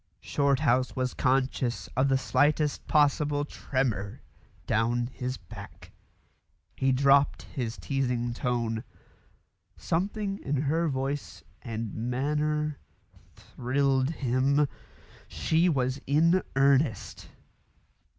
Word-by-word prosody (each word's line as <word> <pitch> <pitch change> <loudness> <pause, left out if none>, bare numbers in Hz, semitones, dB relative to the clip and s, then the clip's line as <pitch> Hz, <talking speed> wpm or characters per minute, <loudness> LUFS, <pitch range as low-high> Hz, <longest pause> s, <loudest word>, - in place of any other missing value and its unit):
Shorthouse 135 - +1
was 130 -1 -1
conscious 130 -2 0
of 130 +2 +2
the 135 - +3
slightest 145 +3 +1
possible 145 0 +2
tremor 120 -9 -2 0.4
down 120 +2 +1
his 125 +1 -5
back. 100 -3 -12 0.8
He 135 0 +1
dropped 140 +2 +3
his 120 -4 -5
teasing 125 +2 -1
tone. 120 -2 -1 0.9
Something 195 +3 -2
in 140 -1 -1
her 165 +4 +1
voice 135 0 -3 0.2
and 115 -2 -5
manner 150 +5 -1 0.6
thrilled 135 +1 0
him. 140 0 +1 0.6
She 165 +3 +1
was 130 -2 0
in 165 +6 +4
earnest. 135 -4 +1
135 Hz, 90 wpm, -28 LUFS, 125-145 Hz, 0.9 s, in